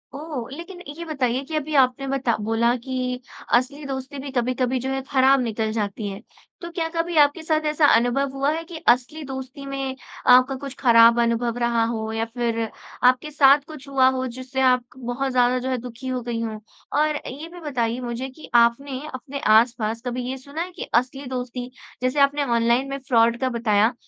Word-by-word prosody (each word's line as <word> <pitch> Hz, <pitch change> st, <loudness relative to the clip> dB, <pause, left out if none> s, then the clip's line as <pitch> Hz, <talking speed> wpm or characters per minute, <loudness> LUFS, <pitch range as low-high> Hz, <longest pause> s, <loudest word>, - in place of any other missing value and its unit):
ओह! 285 Hz, -5 st, -5 dB
लेकिन 345 Hz, +5 st, -9 dB, 0.2 s
ये 340 Hz, -, -5 dB
बताइए 265 Hz, -5 st, -1 dB
कि 315 Hz, -, -3 dB
अभी 305 Hz, 0 st, -2 dB
आपने 255 Hz, +1 st, 0 dB
बता 265 Hz, -4 st, 0 dB
बोला 235 Hz, +2 st, +2 dB
कि 250 Hz, 0 st, -3 dB, 0.4 s
असली 265 Hz, +5 st, 0 dB
दोस्ती 270 Hz, +1 st, -5 dB
भी 275 Hz, 0 st, -6 dB
कभी-कभी 255 Hz, 0 st, 0 dB
जो 260 Hz, +2 st, -3 dB
है 270 Hz, 0 st, -1 dB
खराब 270 Hz, 0 st, +4 dB
निकल 220 Hz, -2 st, -1 dB
जाती 210 Hz, -1 st, -3 dB
है। 195 Hz, 0 st, -7 dB, 0.4 s
तो 340 Hz, -, -6 dB
क्या 335 Hz, -1 st, -2 dB
कभी 335 Hz, +1 st, -1 dB
आपके 295 Hz, +2 st, +4 dB
साथ 310 Hz, -1 st, 0 dB
ऐसा 300 Hz, 0 st, +3 dB
अनुभव 245 Hz, +4 st, +2 dB
हुआ 275 Hz, +2 st, +1 dB
है 325 Hz, +1 st, -3 dB
कि 335 Hz, 0 st, -9 dB
असली 250 Hz, +6 st, +2 dB
दोस्ती 265 Hz, +1 st, -7 dB
में 270 Hz, -1 st, -4 dB, 0.4 s
आपका 255 Hz, +2 st, +5 dB
कुछ 275 Hz, -2 st, -5 dB
खराब 230 Hz, -2 st, +6 dB
अनुभव 235 Hz, 0 st, 0 dB
रहा 235 Hz, -1 st, +1 dB
हो 220 Hz, -1 st, -3 dB
या 225 Hz, 0 st, -1 dB
फ़िर 230 Hz, 0 st, -2 dB, 0.5 s
आपके 255 Hz, +4 st, -1 dB
साथ 280 Hz, -1 st, +6 dB
कुछ 305 Hz, -3 st, -11 dB
हुआ 265 Hz, -2 st, +4 dB
हो 260 Hz, -, -1 dB
जिससे 260 Hz, +1 st, -4 dB
आप 250 Hz, -1 st, +4 dB
बहुत 260 Hz, +2 st, -3 dB
ज़्यादा 250 Hz, 0 st, +3 dB
जो 255 Hz, +1 st, -3 dB
है 255 Hz, -, 0 dB
दुखी 250 Hz, +2 st, -8 dB
हो 255 Hz, -1 st, -2 dB
गई 235 Hz, -1 st, -3 dB
हों। 220 Hz, -2 st, -4 dB, 0.4 s
और 305 Hz, 0 st, +1 dB
ये 290 Hz, +6 st, -7 dB
भी 355 Hz, -, -9 dB
बताइए 250 Hz, -7 st, -2 dB
मुझे 245 Hz, +2 st, -4 dB
कि 265 Hz, +4 st, -13 dB
आपने 255 Hz, +3 st, +3 dB
अपने 275 Hz, +2 st, -6 dB, 0.2 s
आस-पास 230 Hz, -1 st, +2 dB
कभी 250 Hz, 0 st, -3 dB
ये 265 Hz, -, -3 dB
सुना 280 Hz, +5 st, -6 dB
है 360 Hz, +2 st, -4 dB
कि -, -, -7 dB
असली 255 Hz, +4 st, +1 dB
दोस्ती, 250 Hz, -1 st, -5 dB, 0.3 s
जैसे 255 Hz, +3 st, 0 dB
आपने 285 Hz, +1 st, +3 dB
ऑनलाइन 235 Hz, +1 st, +2 dB
में 275 Hz, -, -3 dB
फ्रॉड 230 Hz, -2 st, +4 dB
का 260 Hz, -, +1 dB
बताया। 225 Hz, -1 st, +2 dB
255 Hz, 195 wpm, -23 LUFS, 235-275 Hz, 0.5 s, खराब